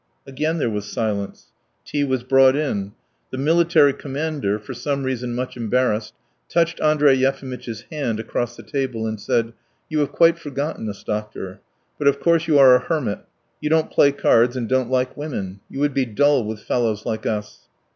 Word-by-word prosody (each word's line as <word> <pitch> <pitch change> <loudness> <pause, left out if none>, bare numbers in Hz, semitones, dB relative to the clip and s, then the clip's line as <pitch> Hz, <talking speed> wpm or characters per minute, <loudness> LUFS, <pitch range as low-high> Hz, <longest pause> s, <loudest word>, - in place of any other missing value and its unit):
Again 155 +4 -2
there 145 - 0
was 105 -2 -4
silence. 100 -3 -3 0.4
Tea 145 - -1
was 130 -3 -1
brought 135 +1 +5
in. 105 -10 -2 0.4
The 130 - -6
military 160 0 +4
commander, 140 -7 -2
for 105 +5 -9
some 140 +2 -2
reason 125 -2 -3
much 125 +1 -4
embarrassed, 115 -2 0 0.3
touched 170 -1 +1
Andrey 150 -2 +4
Yefimitch's 130 -4 -2
hand 130 -8 -2
across 120 +1 -3
the - - -10
table 130 -6 -3
and 110 -1 -3
said: 115 +2 0 0.4
"You 155 -1 0
have 145 - 0
quite 165 0 +4
forgotten 140 -5 -4
us, 100 - -8
doctor. 105 -3 -5 0.4
But 145 - +1
of 140 0 +3
course 170 +1 +2
you 155 -3 +4
are 135 -2 +8
a - - +4
hermit: 130 -6 -2 0.4
you 150 - -1
don't 160 0 +2
play 140 - +5
cards 125 -3 +3
and 120 -2 -2
don't 130 -1 +1
like 130 0 0
women. 100 -11 -5
You 135 - -7
would 145 -1 +1
be 135 -1 +1
dull 135 +2 +2
with 105 -1 -6
fellows 110 -3 -1
like 110 - -3
us." 105 -1 -4
130 Hz, 180 wpm, -22 LUFS, 110-145 Hz, 0.4 s, are